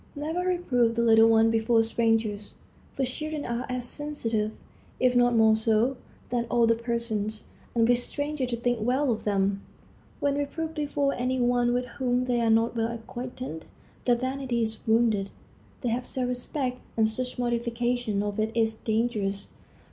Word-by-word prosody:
Never 310 +4 -3
reprove 315 -11 +1
the 235 - +1
little 225 -1 +6
ones 225 0 +5
before 225 0 +3
strangers; 225 -2 0 0.4
for 270 - 0
children 305 +4 -4
are 235 +1 -3
as 250 -1 -2
sensitive, 230 -8 -2 0.5
if 250 -1 +3
not 245 -1 +4
more 220 -1 +5
so, 225 +4 +2 0.4
than 240 -1 0
older 230 -1 +4
persons, 230 -2 -2 0.3
and 230 -1 +4
wish 245 0 +3
strangers 285 0 -3
to 240 - -1
think 240 0 0
well 255 +4 +1
of 220 - -3
them. 200 -1 +1 0.6
When 285 0 +1
reproved 320 +3 -3
before 285 -2 0
any 255 +1 -1
one 245 0 +2
with 245 +1 0
whom 250 0 -1
they 245 -1 +1
are 230 - +2
not 225 +1 +3
well 225 0 0
acquainted, 235 -5 -7 0.4
their 245 - +4
vanity 255 -1 -1
is 220 0 -3
wounded. 220 -3 +2 0.5
They 245 - -1
have 245 +2 -2
self 250 -1 -1
respect, 250 +1 -3 0.2
and 220 -1 +4
such 250 +3 -3
mortification 240 -2 -1
of 205 0 -3
it 215 +1 0
is 225 -1 +2
dangerous. 220 -3 -1
240 Hz, 165 wpm, -27 LUFS, 225-250 Hz, 0.6 s, little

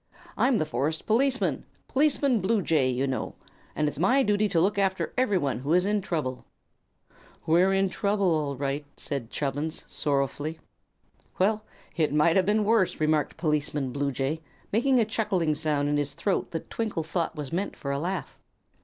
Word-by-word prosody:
"I'm 255 -2 +3
the 155 - +1
forest 150 +3 -2
policeman 255 +4 +1 0.2
Policeman 280 -4 +2
Bluejay, 175 - +2
you 130 +2 0
know 130 -2 -3 0.4
and 150 - +1
it's 150 - -4
my 255 +10 +4
duty 210 -1 +2
to 175 -3 +2
look 200 +4 +2
after 190 -1 0
everyone 185 - +1
who 140 +5 -1
is 180 +1 +4
in 205 0 +1
trouble." 150 -9 -3 1.0
"We're 175 +4 +4
in 195 0 +3
trouble, 200 -2 +1
all 145 -3 -1
right," 140 +2 -2
said 135 -6 -4
Chubbins, 145 +4 -3
sorrowfully. 145 +2 -1 0.8
"Well, 215 +3 +1 0.3
it 155 -4 +1
might 150 +3 +3
have 190 -1 +3
been 210 +1 +3
worse," 215 -3 +2
remarked 155 -1 +1
Policeman 150 -4 -1
Bluejay, 140 +2 -1 0.3
making 250 +4 +3
a 225 - +3
chuckling 205 -7 0
sound 150 -2 0
in 145 0 +1
his 145 -1 -2
throat 200 - -1
that 165 - -6
Twinkle 215 -8 -2
thought 165 +1 -2
was 150 -2 -6
meant 190 +4 -2
for 140 - -4
a 140 - -1
laugh. 180 +5 -4
165 Hz, 165 wpm, -27 LUFS, 145-205 Hz, 1.0 s, my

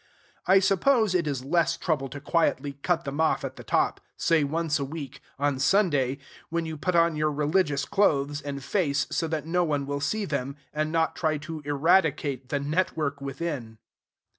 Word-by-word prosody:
I 190 +1 +7
suppose 200 +3 +3
it 175 -4 +1
is 135 -3 -3
less 170 +2 +2
trouble 145 -6 -1
to 145 - -7
quietly 145 -2 0
cut 170 0 +1
them 140 +3 -2
off 160 - +1
at - - -6
the - - -10
top - - +1 0.2
say 165 -3 +3
once 155 +1 0
a - - -1
week, 140 -1 -7 0.2
on 140 -1 0
Sunday, 140 -5 +2 0.3
when 170 0 -1
you 160 -1 -4
put 175 +4 -1
on 170 -1 +4
your 150 0 +1
religious 150 -1 +1
clothes 145 -8 +1
and 140 -1 -5
face 145 -2 +1
so 165 - 0
that 155 -2 -3
no 175 +2 +1
one 145 -4 -1
will 140 0 -3
see 210 +9 -1
them, 140 -4 -3 0.2
and 155 +1 -1
not 165 -1 +1
try 155 -2 0
to 160 -2 -6
eradicate 145 -3 +2
the 145 - 0
network 150 -2 -1
within. 135 -5 -4
150 Hz, 185 wpm, -27 LUFS, 140-170 Hz, 0.3 s, I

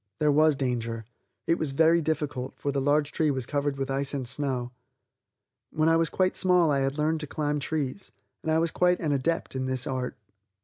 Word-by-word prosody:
There 150 -1 +3
was 155 +1 +4
danger. 115 -4 -2 0.4
It 165 - +1
was 145 -4 -2
very 165 +3 +4
difficult, 145 -4 -2
for 140 - -2
the 140 -1 -1
large 145 +1 +2
tree 155 -2 +1
was 130 -3 -1
covered 145 +1 -1
with 135 0 -2
ice 140 +1 -1
and 130 -3 -3
snow. 125 -2 -2 1.0
When 155 +1 +1
I 165 - +4
was 165 0 +2
quite 185 -1 +1
small 180 -4 +4
I 140 - +2
had 135 +2 -1
learned 155 +1 +1
to 150 - -6
climb 150 0 -1
trees, 145 +4 -3 0.3
and 160 - -2
I 160 - +3
was 165 0 +1
quite 180 0 +2
an 155 -3 -1
adept 145 +2 -1
in 130 0 -2
this 130 -1 -1
art. 130 -1 -3
145 Hz, 210 wpm, -27 LUFS, 135-160 Hz, 1.0 s, was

